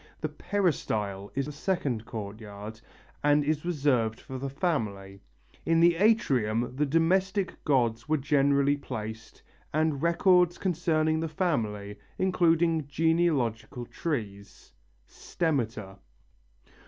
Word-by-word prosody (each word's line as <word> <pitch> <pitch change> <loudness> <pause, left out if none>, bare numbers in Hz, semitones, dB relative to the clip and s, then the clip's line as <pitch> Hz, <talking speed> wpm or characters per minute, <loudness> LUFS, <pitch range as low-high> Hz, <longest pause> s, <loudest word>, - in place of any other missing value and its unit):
The 155 - -2
peristyle 120 - -2
is 135 0 0
the 150 - -6
second 140 - -2
courtyard, 105 0 -8 0.4
and 145 0 +4
is 150 +1 -1
reserved 135 -10 +1
for 130 -1 -8
the 135 +1 -3
family. 105 - -3 0.4
In 165 0 +2
the 170 +1 +6
atrium 125 - +2
the 150 +2 +1
domestic 185 +5 +1
gods 120 -3 +1
were 155 - +3
generally 140 0 +2
placed 110 -4 -7 0.3
and 155 -2 0
records 175 +1 +3
concerning 160 -3 +1
the 165 0 -2
family, 105 - -2 0.2
including 165 -4 +2
genealogical 140 -7 0
trees 105 -11 -5 0.3
(stemmata). 115 - -3
145 Hz, 105 wpm, -28 LUFS, 110-165 Hz, 0.4 s, the